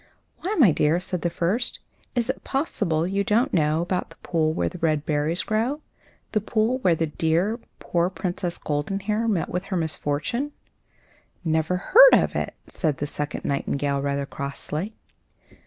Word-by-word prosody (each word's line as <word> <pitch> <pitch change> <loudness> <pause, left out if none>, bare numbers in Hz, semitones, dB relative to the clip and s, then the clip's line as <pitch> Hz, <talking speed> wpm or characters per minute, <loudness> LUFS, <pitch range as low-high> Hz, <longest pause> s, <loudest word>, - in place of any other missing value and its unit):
"Why, 395 +5 -2
my 240 - +7
dear," 155 +3 +2
said 180 -1 -3
the 170 - +1
first, 190 +8 0 0.4
"is 240 -1 +1
it 260 - -3
possible 200 - 0
you 195 +2 0
don't 220 +5 +2
know 155 0 +2
about 180 +1 -2
the - - -15
pool 160 -2 +1
where 160 - 0
the 180 - -6
red 155 -2 +1
berries 155 +3 0
grow 230 +7 0 0.5
the 215 - +1
pool 225 +4 +1
where 180 -9 +3
the 165 - 0
poor, 150 - -10
dear 175 0 0
Princess 180 -2 -3
Goldenhair 195 +9 -1
met 200 -7 0
with 180 +2 -3
her 190 -2 -2
misfortune?" 160 - -1 0.9
"Never 160 +2 +1
heard - - +8
of - - +4
it," - - -2
said 155 -6 -1
the 145 - -2
second 150 +1 -4
nightingale, 140 0 0
rather 140 0 -1
crossly. 150 +9 -5
175 Hz, 160 wpm, -25 LUFS, 155-215 Hz, 0.9 s, heard